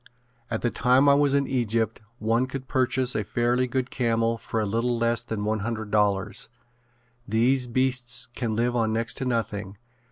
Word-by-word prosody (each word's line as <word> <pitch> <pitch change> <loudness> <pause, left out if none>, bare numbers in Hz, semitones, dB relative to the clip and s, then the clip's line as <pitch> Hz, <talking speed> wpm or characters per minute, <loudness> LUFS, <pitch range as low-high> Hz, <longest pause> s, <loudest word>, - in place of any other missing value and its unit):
At 110 - -3
the 120 - +1
time 130 +2 +3
I 140 - +7
was 140 -1 +3
in 140 0 +2
Egypt 115 -4 -1 0.2
one 115 +3 +1
could 135 -1 -6
purchase 130 -1 +1
a 110 - 0
fairly 120 +4 +1
good 125 +1 -2
camel 115 -2 0
for 110 - -3
a 110 - 0
little 115 +4 0
less 115 0 +1
than 105 -2 -4
one 110 +1 0
hundred 110 0 -4
dollars. 105 0 0 0.8
These 125 +4 +2
beasts 125 -1 0
can 115 -4 -2
live 120 +2 0
on 110 -2 +1
next 115 +1 0
to 135 - -3
nothing. 105 -5 -2
115 Hz, 180 wpm, -26 LUFS, 110-125 Hz, 0.8 s, I